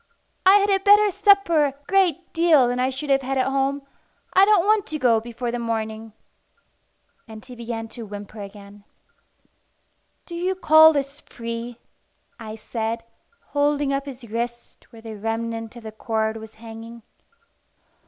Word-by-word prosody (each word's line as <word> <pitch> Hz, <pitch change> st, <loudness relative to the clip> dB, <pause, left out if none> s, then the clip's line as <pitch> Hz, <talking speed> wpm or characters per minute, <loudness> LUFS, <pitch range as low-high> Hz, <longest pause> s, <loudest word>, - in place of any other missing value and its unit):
"I 385 Hz, -, +8 dB
had 405 Hz, 0 st, +3 dB
a 390 Hz, -, +3 dB
better 410 Hz, +1 st, +5 dB
supper 395 Hz, -5 st, +4 dB
a 280 Hz, -, -2 dB
great 360 Hz, -3 st, +1 dB
deal 325 Hz, -6 st, +4 dB
than 245 Hz, +1 st, -2 dB
I 255 Hz, +1 st, +1 dB
should 275 Hz, +2 st, -4 dB
have 270 Hz, 0 st, +3 dB
had 270 Hz, +1 st, -2 dB
at 260 Hz, -, +2 dB
home. 275 Hz, +1 st, -1 dB, 0.5 s
I 380 Hz, +1 st, +6 dB
don't 405 Hz, -4 st, +4 dB
want 425 Hz, -1 st, +2 dB
to 310 Hz, -, -4 dB
go 240 Hz, -5 st, +3 dB
before 235 Hz, +1 st, -5 dB
the 240 Hz, -, -3 dB
morning." 220 Hz, -1 st, -4 dB, 1.1 s
And 220 Hz, 0 st, -11 dB
he 250 Hz, -1 st, -10 dB
began 230 Hz, -1 st, -5 dB
to 225 Hz, -1 st, -8 dB
whimper 205 Hz, +1 st, -9 dB
again. 200 Hz, 0 st, -12 dB, 1.4 s
"Do 345 Hz, -, -11 dB
you 360 Hz, +2 st, -1 dB
call 315 Hz, -2 st, +7 dB
this 280 Hz, -1 st, -3 dB
free?" 230 Hz, 0 st, -7 dB, 0.6 s
I 220 Hz, -1 st, -7 dB
said, 225 Hz, +1 st, -4 dB, 0.5 s
holding 290 Hz, -1 st, +1 dB
up 275 Hz, +1 st, -2 dB
his 250 Hz, -3 st, -9 dB
wrist 235 Hz, +2 st, -5 dB
where 225 Hz, -2 st, -14 dB
the 220 Hz, -2 st, -8 dB
remnant 225 Hz, +1 st, -4 dB
of 240 Hz, -, -11 dB
the 220 Hz, -, -7 dB
cord 220 Hz, 0 st, -2 dB
was 220 Hz, 0 st, -11 dB
hanging. 225 Hz, +1 st, -11 dB
245 Hz, 160 wpm, -23 LUFS, 225-300 Hz, 1.4 s, I